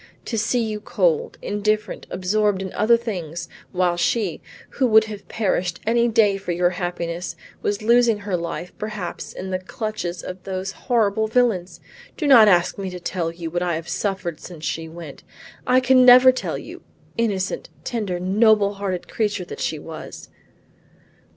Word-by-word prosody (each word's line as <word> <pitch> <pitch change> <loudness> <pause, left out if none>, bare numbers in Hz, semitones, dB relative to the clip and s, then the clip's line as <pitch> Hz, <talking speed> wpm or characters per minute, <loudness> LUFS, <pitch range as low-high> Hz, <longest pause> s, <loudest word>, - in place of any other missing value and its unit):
To 235 - -3
see 235 +2 +1
you 215 -1 -3
cold, 475 - 0
indifferent, 210 +1 -1
absorbed 195 +1 0
in 190 - -6
other 235 +2 +4
things, 180 -8 -5 0.2
while 180 -1 +1
she, 220 +6 0 0.3
who 260 - +1
would 220 -1 +6
have 210 -2 -8
perished 180 -5 -1
any 235 +2 +3
day 215 -3 +3
for 195 -2 -5
your 175 +1 +2
happiness, 175 -1 -4 0.3
was 205 +1 -2
losing 235 -1 +4
her 200 -2 -2
life 170 +1 -5
perhaps 210 -4 -5
in 190 +1 -6
the 185 - -1
clutches 185 -2 -5
of 185 0 -7
those 190 0 -4
horrible 220 -3 +1
villains! 220 -6 +1 0.4
Do 315 - -2
not 245 -7 +8
ask 180 0 +3
me 195 -1 -3
to 180 0 -7
tell 175 -1 -2
you 165 -1 -6
what 175 +1 -1
I 175 -2 0
have 165 +1 -6
suffered 185 -3 -2
since 165 -3 -9
she 160 +1 -3
went; 160 -3 -10 0.5
I 255 - +5
can 255 0 +5
never 250 +1 +9
tell 255 - -3
you, - - -10 0.3
innocent, 200 -5 -1
tender, 205 -7 -2
noble 205 +2 +3
hearted 195 -3 -4
creature 210 -4 -1
that - - -8
she 155 - -1
was." 160 +1 -9
200 Hz, 165 wpm, -22 LUFS, 180-220 Hz, 0.5 s, never